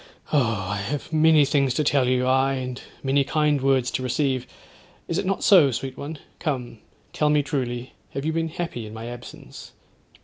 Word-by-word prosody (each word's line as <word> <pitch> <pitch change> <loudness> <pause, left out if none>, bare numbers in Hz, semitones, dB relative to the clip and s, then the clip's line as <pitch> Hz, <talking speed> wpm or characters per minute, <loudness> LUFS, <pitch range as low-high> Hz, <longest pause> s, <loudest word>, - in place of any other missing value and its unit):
Oh! 115 -9 +2
I 100 +2 -2
have 140 +10 -4
many 155 -1 +5
things 140 -3 +1
to 150 - +1
tell 140 -3 +2
you; 125 0 +2
aye! 130 +1 +3
and 125 -1 -5 0.2
many 140 +1 +3
kind 150 0 +1
words 135 -2 +2
to - - -2
receive; 130 0 0 0.6
is 170 - -1
it - - -2
not 195 -1 -1
so, 175 -9 +7
sweet 130 +1 -4
one? 150 +3 -6 0.2
Come, 125 -8 -3 0.3
tell 150 - +2
me 150 -1 +3
truly, 130 -4 -3 0.2
have 140 +1 -3
you 160 - 0
been 165 0 -1
happy 155 -9 -5
in 105 - -10
my 110 +1 -7
absence? 120 0 -10
135 Hz, 190 wpm, -24 LUFS, 125-150 Hz, 0.6 s, so